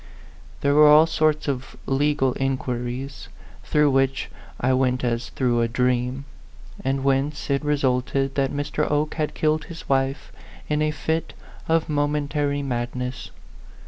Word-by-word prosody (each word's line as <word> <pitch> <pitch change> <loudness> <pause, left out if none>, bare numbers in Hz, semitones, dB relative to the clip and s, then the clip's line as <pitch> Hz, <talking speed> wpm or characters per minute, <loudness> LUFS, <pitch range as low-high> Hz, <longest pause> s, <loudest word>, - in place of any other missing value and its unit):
There 140 0 +2
were 150 +1 +7
all 150 +2 +8
sorts 155 -2 +1
of 135 -2 -4
legal 135 -1 +1
in 135 0 0
quiries, 125 +2 -5 0.4
through 150 -1 +3
which 135 0 +1 0.3
I 130 +1 +2
went 130 -1 +1
as 120 -1 -1
through 120 -3 +1
a 115 - +2
dream; 125 +2 0 0.6
and 135 0 -1
whence 140 +2 0
it 140 +2 +1
resulted 135 -1 0
that 135 0 0
Mr. 145 +1 -2
Oke 150 +1 0
had 155 -2 -2
killed 155 0 +1
his 170 -2 -10
wife 135 0 0 0.4
in 150 0 0
a 155 - +2
fit 160 +2 -2 0.4
of 165 0 +2
momentary 145 -1 0
madness. 125 0 -4
135 Hz, 145 wpm, -23 LUFS, 130-150 Hz, 0.6 s, all